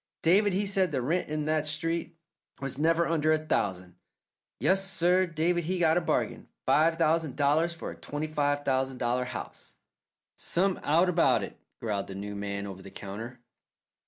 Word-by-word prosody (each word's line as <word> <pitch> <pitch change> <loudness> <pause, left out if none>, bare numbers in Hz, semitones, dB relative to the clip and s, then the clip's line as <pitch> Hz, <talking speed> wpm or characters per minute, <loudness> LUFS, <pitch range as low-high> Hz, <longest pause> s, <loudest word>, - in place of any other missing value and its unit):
David 195 +4 +4
he 200 +2 +1
said 195 -3 +2
the 135 - 0
rent 155 +9 -1
in 150 0 -2
that 155 -1 +1
street 165 +2 -2 0.4
was 135 0 -4
never 165 +2 +3
under 155 -1 +2
a 155 - +4
thousand. 95 - -2 0.6
Yes, 195 +1 +2
sir, 180 0 +3
David 170 +1 0
he 185 +3 -1
got 165 -2 +3
a 175 - +3
bargain - - -1 0.2
five 165 +2 +3
thousand 160 -3 +1
dollars 155 +4 +2
for - - -6
a - - -9
twenty 145 +1 -4
five 145 -2 0
thousand 130 -1 0
dollar 125 +1 0
house." - - -8 0.6
"Some 190 +2 0
out 165 +5 +3
about 175 -1 +3
it!" - - -7 0.2
growled 105 -4 -2
the 95 - -7
new 100 +1 -5
man 100 0 -4
over 95 -1 -8
the 95 - -10
counter. 110 +6 -8
155 Hz, 175 wpm, -29 LUFS, 125-170 Hz, 0.6 s, David